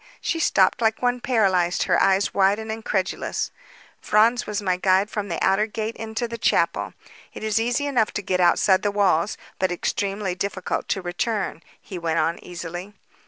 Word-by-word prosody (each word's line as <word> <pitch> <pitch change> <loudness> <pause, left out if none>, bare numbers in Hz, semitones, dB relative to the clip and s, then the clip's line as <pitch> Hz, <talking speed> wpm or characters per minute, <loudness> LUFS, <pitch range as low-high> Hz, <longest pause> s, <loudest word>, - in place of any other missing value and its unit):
She 330 - -2
stopped 195 -8 +3
like 220 +1 +1
one 245 0 +1
paralyzed, 190 -8 +2
her - - +2
eyes 195 +1 +2
wide 195 +1 +3
and 220 0 -5
incredulous. 210 -4 -2 0.5
"Franz 225 +3 +3
was 210 -1 -2
my 185 -3 0
guide 190 +2 +2
from 210 -1 -3
the 170 - -2
outer 200 +3 +3
gate 220 +1 -4
into 225 +1 -4
the 230 0 -7
chapel. - - +1 0.4
It - - -7
is 220 0 +1
easy 240 +5 0
enough 245 -7 +1
to 210 - -3
get 185 -1 0
outside 185 +2 +4
the 205 - +1
walls, 200 -2 +1 0.2
but 185 -1 +1
extremely 195 +2 -2
difficult 190 0 -3
to 190 - -2
return," 185 0 -2 0.2
he 185 - -8
went 165 -1 -1
on 165 0 0
easily. 175 +3 -7
200 Hz, 175 wpm, -23 LUFS, 185-220 Hz, 0.5 s, outside